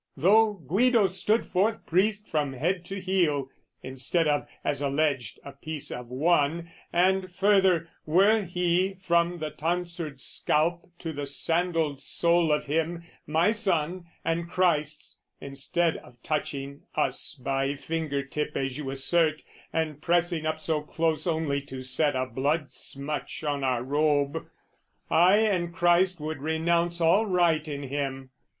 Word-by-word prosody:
"Though 210 +8 +5
Guido 205 - +2
stood 210 +4 +2
forth 205 +5 0
priest 210 +4 +1
from 150 -3 -1
head 175 +7 -1
to 195 +2 -5
heel, 170 -8 0 0.3
"Instead 135 +6 -1
of, 145 -1 +1 0.2
as 145 - -1
alleged, 140 -4 0
a 140 - -7
piece 150 +1 -6
of 125 0 -6
one, 160 +4 +1 0.2
"And 185 +1 +2
further, 190 -3 +3 0.2
were 200 +7 +4
he, 180 +1 0
from 170 0 +2
the 155 -2 -4
tonsured 170 -2 -3
scalp 170 +6 0
"To 165 -2 -5
the 145 -1 -4
sandaled 165 0 0
sole 170 -1 +2
of 150 - +1
him, 165 +3 -1 0.2
my 165 +6 +3
son 180 -5 -1 0.2
and 170 +1 -1
Christ's, 155 -5 0 0.2
"Instead 140 +5 -1
of 125 - -15
touching 140 -2 -3
us 135 +1 0
by 135 +1 -1
finger 150 -2 -3
tip 150 +2 -4
"As 135 0 -2
you 140 -3 -4
assert, 155 +3 +1 0.3
and 155 -2 -2
pressing 170 -2 +1
up 155 0 -1
so 155 -1 0
close 160 +1 -1
"Only 160 -4 0
to 130 -1 -7
set 145 +3 +1
a 130 0 0
blood 140 +5 -1
smutch 145 +3 -5
on 145 -2 -1
our 125 -2 0
robe, 145 +1 0 0.6
"I 180 +5 +6
and 190 -6 +1
Christ 175 +1 +3
would 155 0 -4
renounce 170 +2 0
all 185 +7 +4
right 170 -4 +2
in 145 -1 -5
him. 135 -1 -4
160 Hz, 145 wpm, -27 LUFS, 145-175 Hz, 0.6 s, I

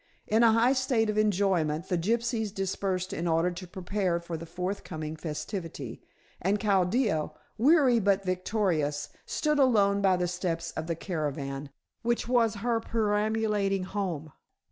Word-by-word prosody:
In 220 +2 +2
a 230 -2 +6
high 235 +3 +4
state 255 -5 +1
of 215 - -4
enjoyment 185 -6 +1
the 180 - 0
gypsies 220 +4 0
dispersed 190 -1 -2
in 170 - -2
order 165 +2 +2
to 180 +1 -8
prepare 185 -1 -1
for 170 -1 -6
the 165 +1 -7
forthcoming 175 -3 -4
festivity, 155 - -5 0.4
and 200 +3 +1
Chaldea, 195 -3 +2 0.3
weary 265 -2 +5
but 200 -1 +2
victorious, 185 -6 0 0.2
stood 300 -1 0
alone 200 -7 +4
by 190 -2 +4
the 180 0 0
steps 170 -2 -2
of 160 - -5
the 165 - -1
caravan, 145 -5 -4 0.3
which 235 0 0
was 235 -3 +3
her 235 -2 +2
perambulating 210 -3 0
home. 185 -6 -3
195 Hz, 145 wpm, -28 LUFS, 170-220 Hz, 0.4 s, a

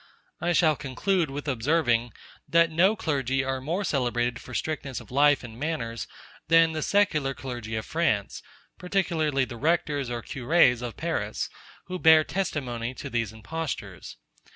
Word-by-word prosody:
I 175 - 0
shall 160 -2 +4
conclude 155 +6 -1
with 145 +2 -6
observing, 120 -3 +1 0.4
that 170 0 +4
no 185 +7 +4
clergy 135 - 0
are 130 0 -2
more 170 +9 -2
celebrated 120 -6 0
for 125 - -9
strictness 145 -5 -3
of - - -14
life 145 +1 +4
and 115 -1 -10
manners 125 -7 -3 0.4
than 165 0 +5
the 155 -1 -3
secular 155 -9 +1
clergy 120 -4 -5
of 110 - -3
France, 145 -12 0 0.4
particularly 165 -7 0
the 120 -2 -8
rectors 145 -2 0
or 120 -2 -4
curés 125 -2 +3
of 120 -3 -6
Paris, - - -2 0.3
who 185 0 -5
bear 160 -1 +7
testimony 130 -10 -3
to 140 - -7
these 115 -3 -1
impostures. 145 +8 -6
140 Hz, 150 wpm, -26 LUFS, 120-165 Hz, 0.4 s, bear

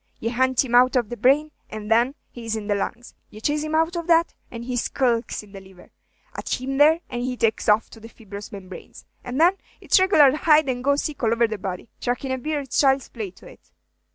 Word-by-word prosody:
Ye 230 - -2
hunt 260 +1 +2
him 240 - -6
out 250 +2 +5
of 240 -4 +1
the 240 - -5
brain, 275 +7 +2 0.2
and 215 0 -7
then 240 +5 +3 0.2
he 240 - -10
is 225 -1 -2
in 215 -2 -5
the 205 - 0
lungs. 235 +4 -4 0.2
Ye 215 - -12
chase 295 +6 0
him 310 +1 -3
out 325 +2 +1
of 340 0 -4
that, 335 0 +3 0.2
and 235 -1 -8
he 250 0 -3
skulks 240 -2 -1
in 205 - -17
the 195 -1 -10
liver. 190 -2 -17 0.4
At - - -3
him 270 +2 -3
there, 315 +3 +5
and 240 - -5
he 250 0 -3
takes 225 -1 0 0.2
to 225 - -13
the 225 +1 -12
fibrous 205 -3 -10
membranes, 190 -3 -11 0.2
and 250 +3 -4
then 355 +4 +4 0.2
it's - - +3
regular 305 -8 +5
hide 305 -1 +4
and 245 -1 -2
go 280 +1 +3
seek 290 -1 -4
all 225 -2 +1
over 230 0 +3
the 215 -2 -5
body. 185 +1 -5
Trackin' 250 +2 -2
a 260 - -2
bear 300 +2 -2
is 270 - -11
child's 270 -1 +2
play 220 -5 -6
to 180 - -19
it." - - -16
250 Hz, 240 wpm, -23 LUFS, 225-290 Hz, 0.4 s, out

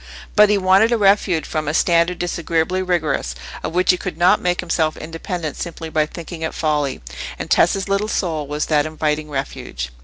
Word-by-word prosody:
But 210 -1 +7
he 210 - +4
wanted 195 +4 +4
a 235 - +3
refuge 195 -5 +3
from 155 -1 -3
a 145 - 0
standard 170 +1 +3
disagreeably 175 +1 -1
rigorous, 160 - -1 0.3
of - - -3
which 180 +1 +4
he 180 - 0
could 180 -3 -5
not 175 +1 +4
make 180 0 0
himself 165 -3 0
independent 165 0 -5
simply 165 -1 -5
by 155 -1 +1
thinking 170 +1 -8
it 160 - -3
folly; 150 - -1 0.3
and - - -6
Tessa's 195 +3 +3
little 200 +2 0
soul 160 -8 -2
was 150 +1 -2
that 150 -1 +2
inviting 155 -1 -2
refuge. 65 - -5
165 Hz, 185 wpm, -20 LUFS, 155-185 Hz, 0.3 s, But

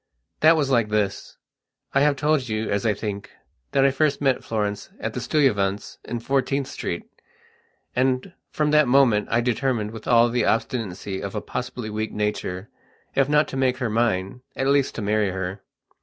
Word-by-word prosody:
That 160 +1 +6
was 140 -3 0
like 115 -4 +3
this: 105 -2 -2 0.6
I 135 - +3
have 145 0 +4
told 145 -2 +1
you, 110 0 -2
as 100 +2 0
I 105 - +2
think, 100 -1 -5 0.4
that 135 -1 +3
I 135 - +5
first 140 +1 +1
met 135 -3 +1
Florence 105 -2 -2
at - - -3
the - - -3
Stuyvesants', 105 -9 0
in 120 - -4
Fourteenth 135 +2 0
Street. 85 -8 -4 0.9
And, 130 +7 0 0.2
from 150 -1 0
that 150 -2 +5
moment, 120 -5 +4
I 115 - +2
determined 120 -3 0
with 110 - -9
all 120 -1 +5
the 120 +1 +1
obstinacy 100 -4 -2
of 100 +1 -5
a - - 0
possibly 125 -2 -5
weak 110 0 -3
nature, 105 -2 -3 0.4
if 135 0 +2
not 150 +1 +4
to 135 - -5
make 130 -1 +1
her 125 -4 -2
mine, 110 -1 0
at 135 - -1
least 140 0 +2
to 115 - -4
marry 105 0 +1
her. 95 +1 -4
120 Hz, 180 wpm, -24 LUFS, 105-135 Hz, 0.9 s, That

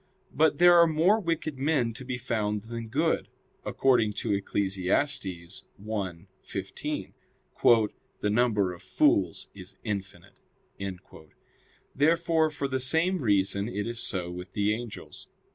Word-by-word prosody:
But 160 0 +3
there 175 0 +7
are 170 - +7
more 165 +7 +3
wicked 165 -6 -2
men 135 -5 +1
to 125 - -9
be 125 -1 -4
found 105 -4 -2
than 115 0 -6
good; 155 +8 0 0.4
according 120 -5 +2
to 105 - -1
Eccles. 100 0 -1
1:15: 95 - -3 1.2
"The 105 - 0
number 105 -5 +2
of 85 - -13
fools - - +1
is 95 0 -9
infinite." 100 -5 -6 1.6
Therefore 160 +2 +3
for 145 -2 -3
the 130 -1 -1
same 165 +8 +2
reason 100 -3 +1
it 105 -3 -3
is 120 0 -4
so 90 -5 -2
with 90 +1 -8
the 105 0 +1
angels. 115 0 -8
115 Hz, 125 wpm, -28 LUFS, 100-145 Hz, 1.6 s, there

